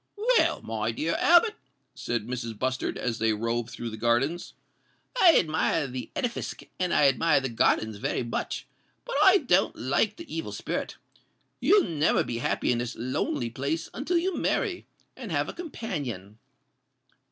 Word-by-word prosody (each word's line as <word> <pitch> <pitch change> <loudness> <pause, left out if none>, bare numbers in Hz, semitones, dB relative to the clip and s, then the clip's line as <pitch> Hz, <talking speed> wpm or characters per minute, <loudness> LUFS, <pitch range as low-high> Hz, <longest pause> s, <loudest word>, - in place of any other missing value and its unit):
"Well, 465 +3 +2
my - - -2
dear - - -1
Albert," 350 +6 +5 0.4
said 120 -3 -3
Mrs. 115 -2 -5
Bustard, 130 +2 -2
as 115 -2 -2
they 110 0 +2
roved 115 +2 -2
through 120 -1 -6
the 110 - -7
grounds, 120 +9 0 0.7
"I 340 -3 +8
admire 160 -1 +1
the 125 -1 -6
edifisk 240 -2 -3 0.2
and 180 -1 0
I 145 - +5
admire 150 +3 +3
the 135 -1 -3
gardens 110 -2 +1
very 110 - -1
much; 115 - -3 0.4
but - - -4
I 390 0 +7
don't - - +2
like - - 0
the 335 -1 -9
evil 330 - -4
spirit. - - -4 0.6
You'll 410 -2 +5
never 155 -2 +2
be 115 - -4
happy 125 - 0
in 120 - +1
this 120 0 -4
lonely 120 0 -2
place 140 +7 -3
until 300 +8 0
you 360 +1 0
marry, 370 -4 -1 0.3
and - - -8
have - - 0
a - - -5
companion." 140 - -6
135 Hz, 160 wpm, -27 LUFS, -, 0.7 s, I